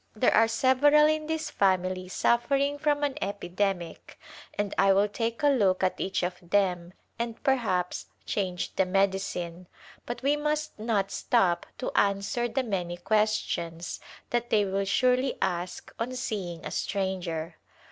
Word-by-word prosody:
There 230 +3 +3
are 225 +1 +5
several 265 +6 +5
in 310 0 +1
this 320 -1 -2
family 185 -1 +1
suffering 275 +8 +1
from 295 -1 +1
an 285 -2 -1
epidemic 190 -3 -3 0.4
and 205 -1 -1
I 195 0 +5
will 200 +2 +3
take 230 +4 -3
a - - +6
look 195 -9 +2
at 185 - +1
each 190 -1 -1
of 180 0 -2
them 180 -1 0 0.3
and 235 -1 -4
perhaps 205 -10 0 0.2
change 185 -3 -2
the 190 - +4
medicine, 185 -2 -1 0.4
but 240 +1 -5
we 285 +2 +3
must 300 -3 -2
not 210 -3 0
stop 190 -8 +1
to 255 - -3
answer 200 +4 +1
the 260 +3 -1
many 180 -6 -3
questions 175 -4 -1 0.3
that 240 0 0
they 210 -2 +3
will 195 +1 -1
surely 255 +6 +2
ask 180 0 -3
on 240 +3 -2
seeing 190 -9 -4
a - - -4
stranger. 175 -5 -2
200 Hz, 145 wpm, -28 LUFS, 185-250 Hz, 0.4 s, a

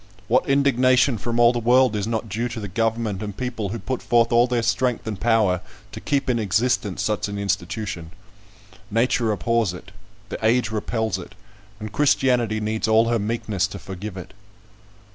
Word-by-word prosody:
What - - +2
indignation 130 -3 +3
from 120 +3 -2
all 120 0 +6
the 120 - -1
world 125 0 +4
is 105 0 -2
not 115 -1 -2
due 115 +4 -2
to 115 - -6
the 105 - -5
government 110 0 -1
and 105 -2 -6
people 120 -5 -3
who 115 - -4
put 130 +2 -4
forth 120 -1 +2
all 120 +1 +4
their 120 -2 0
strength 125 +1 0
and 105 -4 -4
power 110 -5 +2 0.3
to - - -8
keep 140 -1 -1
in 125 -2 +1
existence 105 -2 0
such 105 0 -1
an 100 0 -5
institution? 100 -3 -3 0.8
Nature 115 0 +1
abhors 110 -2 0
it; 90 - -12 0.4
the - - -6
age 115 0 +2
repels 110 -2 -2
it; 95 +3 -11 0.4
and 110 -1 -6
Christianity 125 -6 +2
needs 110 +1 -2
all 110 +1 +4
her 115 -1 +1
meekness 105 -3 -1
to 100 - -8
forgive 95 +1 -7
it. 90 - -9
110 Hz, 180 wpm, -23 LUFS, 105-120 Hz, 0.8 s, all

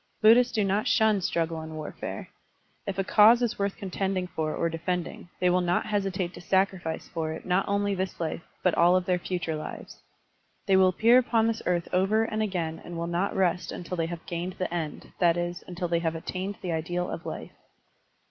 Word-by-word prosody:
Buddhists 235 +3 +6
do 215 - +1
not 200 +2 +1
shun 215 -3 +3
struggle 165 -2 -1
and 160 0 -8
warfare. 155 -1 -6 0.6
If 195 -1 -3
a 195 - +1
cause 225 +5 +6
is 235 - -1
worth 200 0 -1
contending 190 -2 -2
for 160 -3 -3
or 170 - 0
defending, 175 +1 -3
they 180 - +2
will 180 +1 +3
not 175 0 +1
hesitate 195 -4 -1
to - - -10
sacrifice 190 -3 0
for 160 -2 -3
it 160 - -8
not 185 +2 +1
only 200 0 +1
this 190 -1 -3
life 165 0 -2 0.2
but 180 - +3
all 175 +2 +5
of 185 -1 +1
their 180 -1 +1
future 175 -3 -3
lives. 155 - -8 0.6
They 195 - +4
will 190 0 +6
appear 230 +7 +5
upon 235 -3 +2
this 225 0 0
earth 175 -1 +1
over 195 +4 +3
and 220 -1 -2
again 175 -6 -2
and 175 - -7
will 170 - -2
not 175 +3 -1
rest 180 -2 +1
tmtil 180 +1 -5
they 165 -2 -1
have 170 -1 -7
gained 175 +2 -4
the 185 -2 -2
end, 160 -4 -5
that 175 -1 +4
is, 175 +1 -3
until 180 0 -3
they 170 0 +1
have 165 -1 -1
attained 185 +4 -4
the 180 - -2
ideal 175 +2 -2
of - - -6
life. - - -6
180 Hz, 205 wpm, -27 LUFS, 170-195 Hz, 0.6 s, Buddhists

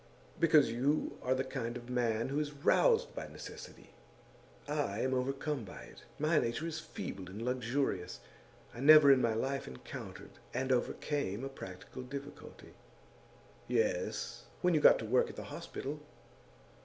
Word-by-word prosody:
'Because 155 -7 +5
you 135 +6 0
are 130 +1 +1
the 130 - 0
kind 120 -3 -4
of 120 -1 -11
man 120 -2 0
who 140 +2 0
is 150 -1 -2
roused 460 - +3
by - - -5
necessity. - - -10 0.8
I 145 -8 -1
am 130 0 +1
overcome 135 +1 -1
by 100 - -9
it. - - -14
My 155 +2 +3
nature 120 +7 -1
is 165 -1 -3
feeble 95 - -7
and 100 +3 -8
luxurious. 125 -4 -1 0.5
I - - -9
never 145 +1 +9
in 135 -2 +5
my 115 -2 +2
life 135 +4 -2
encountered 65 0 -9 0.2
and 130 +1 0
overcame 125 -2 -1
a 135 - -3
practical 95 -1 -9
difficulty.' 140 +3 -9 0.9
'Yes; 475 +1 -1 0.2
when 180 0 +4
you 155 - +4
got - - +7
the 115 - -5
work 125 +4 +3
at - - -9
the - - -6
hospital. - - -5
130 Hz, 155 wpm, -33 LUFS, 120-150 Hz, 0.9 s, never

